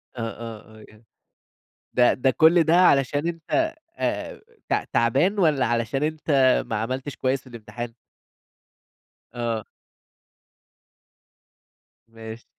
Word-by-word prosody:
آه، 120 - -5
آه، 110 -1 -10
آه، - - -14
يعني 110 +1 -20 0.9
ده 125 -1 +4
ده 130 +1 +1
كل 165 +4 +5
ده 160 +2 +3
علشان 145 -3 +3
أنت 320 - -1 0.2
آآ، - - -3 0.3
ت - - 0
تعبان 145 - +2
والَّا 150 -8 +3
علشان 120 +4 -1
أنت 155 0 -2 0.4
ما 115 - -3
عملتش 130 +4 -4
كويس 130 +1 -1
في - - -20
الإمتحان؟ 120 0 -8 1.4
آه. 115 -3 -2 2.4
ماشي. 115 0 -10
130 Hz, 110 wpm, -24 LUFS, 115-155 Hz, 2.4 s, كل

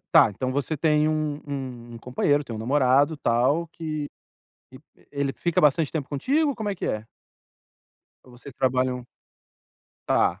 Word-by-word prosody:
Tá, - - +7
então 130 +6 -3
você 140 +3 -1
tem 150 0 +3
um 155 -1 -1
um 130 -4 -6
um - - -8
companheiro, 140 +4 +1
tem 120 - -6
um - - -5
namorado, 135 +5 +3
tal 135 +7 +2
que 155 -2 -4 0.7
e, - - -11 0.2
eh, - - -25
ele 140 -1 -1
fica 170 +3 0
bastante 150 0 +3
tempo 150 -4 -3
contigo, 280 - +1
como 220 -3 -4
é 200 - -1
que 180 - -4
é? 110 0 -2 1.2
Ou 130 - -17
vocês 125 +3 -12
trabalham 130 -1 0 1.0
Tá. - - +2
140 Hz, 160 wpm, -25 LUFS, 125-155 Hz, 1.2 s, Tá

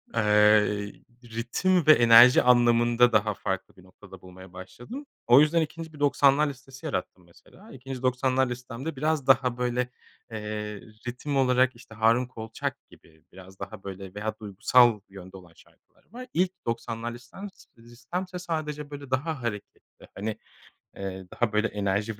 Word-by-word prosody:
Eee, 105 -1 +3 0.3
ritim 120 +10 -1
ve 155 - +10
enerji 120 0 +7
anlamında 120 0 +4
daha 105 0 +2
farklı 95 -1 -5
bir 95 - -18
noktada 95 0 -16
bulmaya 95 0 -14
başladım. 120 - -10 0.2
O 120 +3 +8
yüzden 160 +2 +3
2. 160 +1 -6
bir 150 - -13
90'lar 145 0 +3
listesi 135 +2 -10
yarattım 90 - -4
mesela. 180 - -19
2. 130 0 -8
90'lar 130 +1 +1
listemde 125 +5 -6
biraz 150 0 -1
daha, 130 -2 +3
böyle, 125 0 -1 0.4
eee, 105 -1 -5 0.3
ritim 135 +4 -3
olarak, 130 -1 +3
işte, 115 -1 -15
Harun 115 +3 +3
Kolçak 115 -3 -6
gibi 80 -2 -21
biraz 95 +1 -15
daha, 95 0 -8
böyle, 95 -1 -8
veya 110 +1 -4
duygusal 115 +2 +3
yönde 95 -1 -12
olan 90 -2 -16
şarkılar - - -25
var. 250 +2 -9
İlk 180 +1 +1
90'lar 115 0 -4
listem 125 +12 -10
s - - -21
listemse, 155 +11 -7
sadece, 150 -4 -4
böyle, 140 -2 -9
daha 145 +2 -2
hareketli 105 -4 -8
hani, 105 +2 -4 0.6
eee, 95 -1 -6
daha 120 -3 -1
böyle 105 +1 +2
enerji 105 +1 -2
120 Hz, 150 wpm, -26 LUFS, 105-135 Hz, 0.6 s, ve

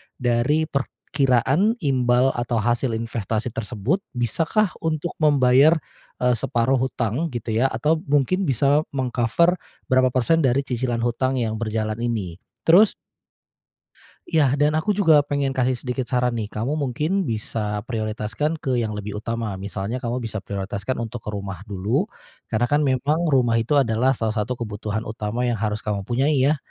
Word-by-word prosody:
dari 125 +5 +1
perkiraan 140 - +1
imbal 130 -2 +3
atau 120 0 -1
hasil 120 +2 0
investasi 115 0 -3
tersebut, 115 - -2 0.2
bisakah 165 - +1
untuk 160 +1 -2
membayar, 145 0 +5 0.5
eee, 125 0 +4
separuh 120 +4 +1
hutang 130 +3 -1
gitu 115 -1 -3
ya, 115 +5 +3
atau 155 +4 0
mungkin 145 +7 +2
bisa 140 +3 +3 0.2
meng-cover 130 +7 +1 0.3
berapa 130 0 +5
persen 160 +6 +3
dari 135 -2 +2
cicilan 120 -3 -2
hutang 130 +2 0
yang 110 -3 -1
berjalan 110 -1 -2
ini. 105 -8 -3 0.2
Terus 190 +6 +6 1.3
Ya, 145 -4 +2
dan 150 +1 +3
aku 160 +7 0
juga 160 -7 +5
pengen 140 -1 -1
kasih 130 -1 +1
sedikit 125 -1 -3
saran 125 -1 +1
nih. 110 -2 -3
Kamu 120 +8 -2
mungkin 155 +7 0
bisa 105 -2 -3
prioritaskan 110 +6 -2
ke 130 -3 -1
yang 110 -2 -1
lebih 105 0 -5
utama. 115 -2 -3
Misalnya 100 +5 -4
kamu 120 +1 -2
bisa 110 -4 -5
prioritaskan 100 +4 -4
untuk 115 -1 -5
ke - - -5
rumah 100 -3 -6
dulu, 110 - -1 0.4
karena 120 +2 +1
kan 145 +4 +2
memang 140 +4 +1
rumah 125 -5 +3
itu 145 +6 +2
adalah 125 0 +2
salah 110 -2 -1
satu 115 +3 -2
kebutuhan 105 -1 -4
utama 110 +3 -2
yang 120 -1 0
harus 105 -1 -1
kamu 105 -2 -2
punyai 130 +9 +1
ya. 145 +4 +3
125 Hz, 155 wpm, -23 LUFS, 110-140 Hz, 1.3 s, Terus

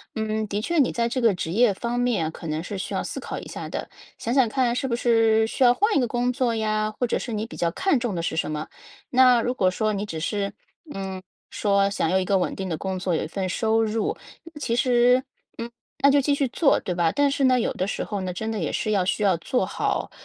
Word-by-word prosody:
嗯， 220 0 -1
的 205 +1 -2
确 340 +8 -1
你 270 - +3
在 235 -1 0
这 255 - -2
个 230 -3 +4
职 165 -2 -4
业 220 +2 +4
方 235 +4 -3
面 205 -11 0
可 165 - -9
能 155 +1 -2
是 200 +2 -5
需 190 - -5
要 - - 0
思 - - -5
考 - - -5
一 - - -10
下 - - -6
的。 - - -5 0.3
想 235 - -2
想 260 -3 +4
看 245 -1 +1
是 265 - -1
不 235 - 0
是 225 -2 +3
需 260 - 0
要 245 -1 +7
换 415 - +1
一 - - +4
个 245 - +1
工 245 +2 0
作 245 -3 0
呀， 215 -1 0
或 245 - +1
者 - - 0
是 240 - -5
你 215 0 -2
比 230 - -10
较 170 -1 0
看 375 - +1
重 235 -4 -2
的 170 - -2
是 165 - -2
什 160 - -1
么。 150 0 -4 0.4
那 250 -2 +5
如 245 - -1
果 185 -7 +2
说 215 +3 0
你 200 +1 -2
只 165 -5 -5
是， 200 +4 -2 0.4
嗯， 190 -1 -5 0.3
说 200 -1 +2
想 195 -5 -1
要 185 - +1
有 - - +2
一 - - -2
个 195 +1 +2
稳 180 - -1
定 190 -1 -4
的 160 - -2
工 190 +1 -3
作、 180 -1 -1
有 - - -1
一 - - -4
份 190 +3 -3
收 225 +3 +1
入， 220 0 -1 0.4
其 235 -5 -1
实， 250 +1 +4 0.3
嗯， 230 +1 -5 0.3
那 280 - +5
就 285 - +5
继 285 +2 +1
续 275 -2 +1
做， 275 +2 +3
对 180 - -3
吧？ 170 -2 +2
但 285 -1 +3
是 275 - 0
呢， 255 -1 +4
有 - - 0
的 185 - -2
时 - - -2
候 205 -2 -4
呢， 185 -1 -3
真 220 +5 -3
的 220 - -3
也 160 - -2
是 215 - -1
要 195 -3 +2
需 210 +2 0
要 190 -3 +4
做 250 - -1
好， - - -2
220 Hz, 290 characters per minute, -24 LUFS, 190-245 Hz, 0.4 s, 要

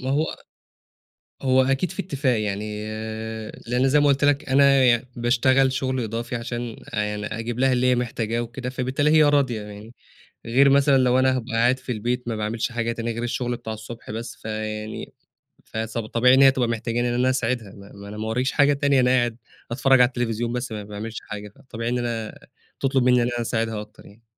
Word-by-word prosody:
ما 130 +1 -3
هو 155 +3 +1 1.2
هو 130 0 +4
أكيد 135 +6 0
فيه - - -4
اتفاق 135 -9 0
يعني، 105 +1 -3 0.8
لأن 125 +3 +2
زي 145 +2 +4
ما 145 - +3
قلت 140 0 +3
لك 145 0 +2
أنا 135 0 +5
ي 120 -1 +3
باشتغل 130 +2 +3
شُغل 130 -1 -1
إضافي 115 +3 -4
عشان 120 -1 -5 0.2
آآ، 105 - +1
يعني 105 0 -4
أجيب 115 +2 -4
لها 130 0 +3
اللي 125 0 +2
هي - - +4
محتاجاه 115 -1 -2
وكده، 120 +2 -5
فبالتالي 130 +4 0
هي 155 0 +6
راضية 140 -7 +2
يعني. 105 +3 -11 0.5
غير 135 +4 +4
مثلًا 140 0 +5
لو 130 0 +3
أنا 130 0 +3
هابقى 120 -1 -6
قاعد 120 +3 +3
في 130 - -6
البيت 120 +2 -2
ما 115 - -2
باعملش 110 +3 -2
حاجة 115 0 -1
تانية 115 0 -3
غير 115 +1 -4
الشُغل 120 0 -2
بتاع 110 -2 -6
الصبح 110 0 -9
بس، 115 +2 -6
فيعني 110 0 -5 0.5
فس 110 +1 -5
فطبيعي 115 +3 +3
إن 135 - +5
هي 135 -1 +8
تبقى 130 -2 0
محتجاني 115 +1 -1
إن - - -1
أنا 125 +1 +2
أساعدها، 120 -4 -1
ما 100 0 -13
ما 100 0 -11
أنا 105 - -8
ما 110 +1 -4
وراييش 125 +4 0
حاجة 145 0 +4
تانية، 140 -1 +2
أنا 125 0 +3
قاعد 120 -3 +1 0.3
أتفرج 130 +1 +4
على 125 - +7
التليفزيون 120 -1 -2
بس 125 -1 -3
ما 105 -1 -5
باعملش 105 +2 -7
حاجة، 105 0 -8
فطبيعي 115 +2 -6
إن 125 - 0
أنا 115 -2 -3 0.4
تطلُب 135 -1 +1
منّي 125 0 +4
إن 120 - 0
أنا 120 0 -2
أساعدها 115 -2 -2
أكتر 105 0 -14
يعني. 105 +3 -17
120 Hz, 205 wpm, -23 LUFS, 110-130 Hz, 1.2 s, هي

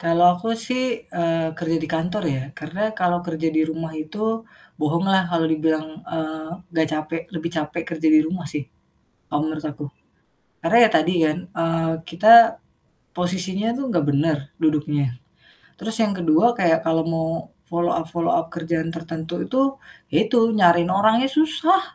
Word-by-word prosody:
Kalau 170 0 +2
aku 180 +6 -5 0.2
sih, 255 0 -1 0.3
eee, 165 -2 -1
kerja 165 -1 -1
di 155 - -4
kantor 180 +6 -2
ya. 135 -4 -1 0.2
Karena 195 +8 -3
kalau 175 -1 +1
kerja 165 -2 -3
di 160 - +4
rumah 160 0 -5
itu, 155 +6 -7 0.6
bohong 165 +5 0
lah 190 -1 +4
kalau 165 -2 +1
dibilang, 160 0 0 0.2
eee, 160 -1 -5 0.3
gak 160 -1 +2
capek, 155 +2 -3
lebih 165 0 -4
capek 155 +2 -3
kerja 160 0 0
di - - +8
rumah 180 +2 -4
sih, 145 -3 -4 0.6
kalau 145 - -2
menurut 155 0 -5
aku. 150 -1 -6 0.8
Karena 165 +8 +3
ya - - -4
tadi 160 +3 +1
kan, 155 +1 0
eee, 165 -1 -1 0.2
kita 225 +7 +7 0.6
posisinya 190 +4 0
tuh - - -3
gak 170 -9 +1
bener, 150 +2 +1 0.2
duduknya, 150 -4 0 0.6
terus 225 +3 -1
yang 210 -2 +1
ke-2 165 +1 +3
kayak 165 -3 +3
kalau 160 0 +2
mau 165 -1 -1 0.4
follow 170 0 0
up 165 - -2
follow 170 0 0
up 165 - 0
kerjaan 165 -1 -2
tertentu 165 +1 -5
itu, 270 +1 +1 0.4
ya - - +2
itu 240 +3 0 0.2
nyariin 175 -3 +5
orangnya 220 +6 +3
susah. 320 +6 +3
165 Hz, 160 wpm, -22 LUFS, 160-185 Hz, 0.8 s, di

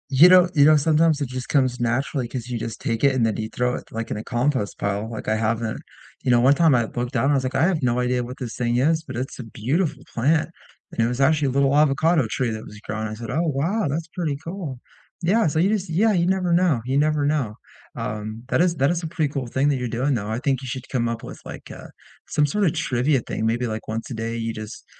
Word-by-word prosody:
You 140 +5 +7
know 180 -1 +7
you 145 -3 +5
know, 155 +1 +7
sometimes 155 +1 +3
it 140 - -2
just 130 0 -5
comes 130 -3 +2
naturally 120 +2 -1
'cause 120 0 -6
you 120 -2 -3
just 115 0 -6
take 115 +1 -2
it 140 -1 +4
and 120 -3 +2
then 110 - 0
you 110 0 -3
throw 125 +1 -1
it, - - -9
like, 115 0 -5
in - - -2
a 105 - -5
compost 120 -3 -1
pile. 100 +2 -2
Like, 115 - -7
I 110 - +2
haven't 110 0 -1 0.4
you - - -1
know, 120 -1 +5
one 130 +4 +5
time 155 -1 +4
I 120 -2 +2
looked 120 +3 -4
down, 135 +3 +2
I - - +3
was 135 -2 +1
like, 130 - -3
I - - +3
have 170 -2 +2
no 125 -2 +1
idea 125 0 0
what 125 +2 -8
this 120 -3 -6
thing 120 -1 0
is, 160 +5 +2
but - - -8
it's 130 +3 -5
a - - -4
beautiful 135 - -2
plant, 155 +6 +2 0.4
and - - -2
it - - +1
was 125 +1 -3
actually 150 +1 +3
a - - 0
little 140 +1 +2
avocado 150 0 +3
tree 125 0 -1
that 110 0 -5
was 105 - -11
growing. 110 0 -4
I 110 - -6
said, 115 +1 -6
"Oh, 155 +6 +1
wow 165 +7 0
that's 155 +4 -2
pretty 160 -5 -2
cool." 165 -7 -6 0.4
Yeah, 210 +5 +3
so 155 - -1
you 185 +4 +3
just 200 -4 -1
yeah. 205 +7 +3
You 170 -3 +2
never 185 -2 +1
know, 170 -7 +3
you 130 +2 -1
never 150 0 +2
know, 145 -8 0 0.4
um, 110 +1 -5
that - - +2
is 175 -1 +2
that 140 +1 +2
is 175 -1 -1
a - - -2
pretty 155 -3 -1
cool 135 -4 -3
thing 135 +4 +1
that 140 - +1
you're 125 -1 -3
doing, 140 +3 +2
though. 105 -4 -2
I 110 - -1
think 135 -1 0
you 130 - -7
should 130 0 -5
come 120 -3 0
up 115 -1 -4
with, - - -9
like, - - -9
uh, - - -10 0.4
some 150 - +2
sort 205 +8 0
of 160 - +2
trivia 135 -2 +1
thing. 110 - -3
Maybe, 120 +2 0
like, 110 -1 -5
once 115 +1 -4
a - - -2
day, 115 0 -3
you 115 0 -3
just 110 0 -8
130 Hz, 270 wpm, -23 LUFS, 115-155 Hz, 0.4 s, You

